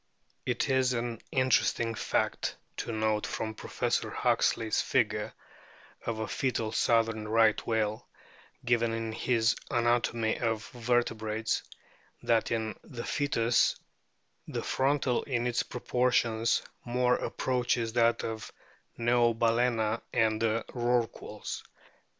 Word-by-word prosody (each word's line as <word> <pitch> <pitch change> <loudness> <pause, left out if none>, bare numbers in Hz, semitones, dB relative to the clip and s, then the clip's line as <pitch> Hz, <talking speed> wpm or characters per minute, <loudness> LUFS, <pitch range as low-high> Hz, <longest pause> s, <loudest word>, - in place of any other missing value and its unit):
It 125 +4 0
is 130 -2 +2
an 115 -1 -3
interesting 130 -3 +2
fact - - -1 0.2
to - - -3
note 110 -1 0
from 110 -1 -3
Professor - - -1
Huxley's 110 -1 +1
figure - - 0 0.8
of 115 -1 -1
a 110 - -3
foetal 115 -4 -1
southern 115 -2 +2
Right 110 0 +3
whale, 110 -1 -1 0.6
given 115 -1 +2
in 115 0 -3
his 115 0 +2
Anatomy 120 -1 +1
of 115 -2 -1
Vertebrates, 115 -2 0 0.6
that 115 -1 +2
in 110 -1 -2
the 120 -3 -7
foetus 120 -5 +2 0.7
the - - -4
frontal 135 -2 +1
in 120 -3 -1
its 120 -1 +1
proportions 120 -2 +1 0.2
more 125 +1 +2
approaches 120 -3 -1
that 115 -1 +3
of 110 -1 -5 0.5
Neobalccna 115 -1 +2
and 110 -2 +2
the 115 0 +1
Rorquals. 120 -2 -2
115 Hz, 110 wpm, -30 LUFS, 110-120 Hz, 0.8 s, Right